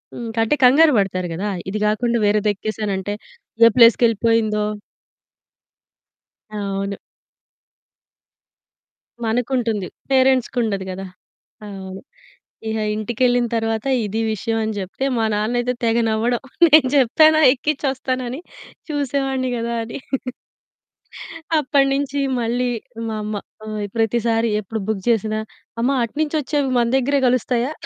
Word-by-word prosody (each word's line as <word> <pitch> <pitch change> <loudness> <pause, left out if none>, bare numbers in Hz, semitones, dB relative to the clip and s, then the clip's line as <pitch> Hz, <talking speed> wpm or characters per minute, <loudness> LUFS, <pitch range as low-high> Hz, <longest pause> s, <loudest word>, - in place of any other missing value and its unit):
హ్మ్. 235 -1 -6
అంటే 225 +7 +2
కంగారు 295 +4 +6
పడతారు 185 -2 0
గదా! 200 +5 -3 0.2
ఇది 210 - -3
కాకుండా 235 +3 +1
వేరేదేక్కేసానంటే 205 -1 -1 0.5
ఏ - - +8
ప్లేస్‌కెళ్ళిపోయిందో 230 -2 +4 1.9
అవును. 200 -1 -3 2.3
మనకుంటుంది. 230 -3 -1 0.2
పేరెంట్స్ 260 -2 +3
కుండదు 210 -6 -1
గదా! 190 +1 -6 0.6
అవును. 190 -1 -8 0.7
ఇక 220 - -2 0.2
ఇంటికేళ్ళిన 240 +3 +1
తరువాత 225 +1 -1 0.2
ఇది 215 +2 -2
విషయం 225 +2 -2
అనే 220 0 -2
జెప్తే 195 +8 -4
మా 225 - +1
నాన్నైతే 240 +4 0
తెగ 230 0 +2
నవ్వడం 230 +2 0 0.3
"నేను 305 -3 +6
జెప్పాన 310 +4 +5 0.2
ఎక్కించోస్తానని 265 -2 -2 0.5
చూసేవాన్ని 270 -2 -1
గదా!" 235 0 -2
అని. 225 - -7 1.6
అప్పటి 275 -1 +2
నుంచి 280 0 -1 0.2
మళ్ళీ 240 +2 0 0.4
మా 220 - -3
అమ్మ 210 0 -4 0.3
ఆ! - - -9 0.3
ప్రతిసారి 230 0 +1
ఎప్పుడు 215 +2 -5
బుక్ 215 -3 -2
చేసినా 215 -1 +1 0.4
అమ్మ 250 +3 +2
అటునుంచి 300 +6 -2
వచ్చేవి 285 -1 -1
మన 235 - +2
దగ్గరే 280 +2 +1
కలుస్తాయా? 250 +1 0
230 Hz, 105 wpm, -20 LUFS, 215-260 Hz, 2.3 s, ఏ